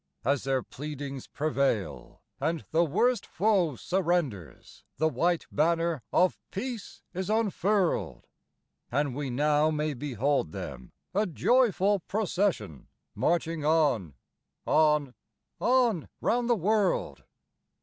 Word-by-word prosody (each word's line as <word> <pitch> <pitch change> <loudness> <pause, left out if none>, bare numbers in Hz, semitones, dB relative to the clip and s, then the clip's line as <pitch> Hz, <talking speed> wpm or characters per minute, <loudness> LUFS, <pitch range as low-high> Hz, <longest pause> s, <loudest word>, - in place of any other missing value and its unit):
As 140 0 +1
their 135 -2 0
pleadings 140 -1 -7
prevail, 140 -8 -2 0.2
and 165 0 -1
"the 165 +2 +4
worst 235 - +2
foe" 185 - +1
surrenders, 170 - -2
The 160 - +2
white 170 +2 0
banner 165 -1 +1
of 180 0 +3
peace 235 0 -6
is 185 +1 -3
unfurled; 210 -3 0 0.7
And 140 +1 0
we 140 +1 -3
now 150 +4 +2
may 155 -1 -1
behold 135 - -1
them, 65 - -7 0.2
a 205 +2 +1
joyful 205 - +3
procession, 185 - -2 0.3
Marching 165 -2 0
on, 145 - +2 0.5
on, 150 -4 +3 0.5
on 240 - +2
round 240 0 +1
the 240 - +5
world. 205 0 0
160 Hz, 110 wpm, -28 LUFS, 140-195 Hz, 0.7 s, the